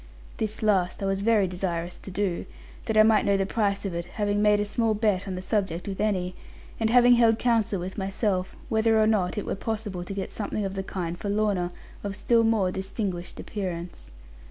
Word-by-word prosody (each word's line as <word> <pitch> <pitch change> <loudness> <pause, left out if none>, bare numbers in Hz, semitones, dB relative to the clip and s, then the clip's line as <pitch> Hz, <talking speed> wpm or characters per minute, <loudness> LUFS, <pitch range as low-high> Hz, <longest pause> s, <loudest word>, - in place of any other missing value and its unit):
This 215 0 -3
last 195 -3 +1
I - - 0
was 195 0 0
very 210 -2 +3
desirous 175 -1 -3
to - - -10
do, 190 -2 -2 0.4
that 220 -1 0
I 215 - +9
might 220 -1 +4
know 200 -1 +3
the 195 - +1
price 200 -1 0
of 195 - -2
it, 170 0 -3
having 205 +2 -1
made 210 0 +4
a 205 - 0
small 220 +1 +1
bet 205 -3 +1
on 190 - -3
the 180 - -5
subject 190 -4 -1
with 195 0 -3
Annie; 185 -4 0 0.5
and 225 -1 +1
having 245 +1 +6
held 225 -2 +5
counsel 225 -5 +1
with 185 +4 -5
myself, 190 -1 -1
whether 220 0 +3
or 215 - +5
not 210 -4 +1
it 210 - -2
were - - -2
possible 210 -3 -3
to 190 - -6
get 195 - -4
something 210 -1 -3
of 190 - -3
the 195 - -2
kind 175 -3 -4
for 205 - -3
Lorna, 200 -4 +1 0.3
of 200 -1 -3
still 230 +3 +3
more 220 -5 +2
distinguished 190 -2 -4
appearance. 175 - -5
200 Hz, 210 wpm, -26 LUFS, 185-215 Hz, 0.5 s, I